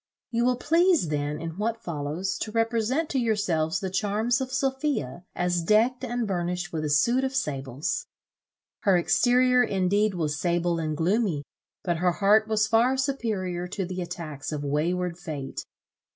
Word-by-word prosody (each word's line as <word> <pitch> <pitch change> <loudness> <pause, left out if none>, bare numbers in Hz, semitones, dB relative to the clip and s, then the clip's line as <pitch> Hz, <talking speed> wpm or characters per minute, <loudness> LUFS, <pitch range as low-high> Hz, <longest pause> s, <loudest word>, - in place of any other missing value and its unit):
You 235 0 +1
will 250 0 +3
please 330 - +3
then, 150 0 -2
in 165 +3 -6
what 230 +2 -2
follows, 165 +4 -3
to 215 - -4
represent 230 +6 +1
to 270 - 0
yourselves 195 -8 0
the 190 -2 -4
charms 215 +6 +1
of 260 0 -3
Sophia 265 - -1
as 175 -1 0
decked 225 +8 +2
and 240 -2 -2
burnished 180 0 -2
with 155 -1 -2
a 150 - -1
suit 235 - +3
of 265 0 -2
sables. 135 - -2 0.7
Her 195 -3 +3
exterior 250 +7 +4
indeed 200 0 +1
was 155 -3 -1
sable 175 -1 0
and 155 -2 -2
gloomy, 180 -3 +1 0.4
but 175 -2 0
her 180 +1 +2
heart 210 +3 +4
was 215 -1 +2
far 230 +4 +3
superior 215 -10 -2
to 190 +1 -3
the 185 +1 -4
attacks 165 -5 -6
of 150 -1 -3
wayward 170 +5 -1
fate. 145 -6 -5
190 Hz, 160 wpm, -26 LUFS, 165-235 Hz, 0.7 s, exterior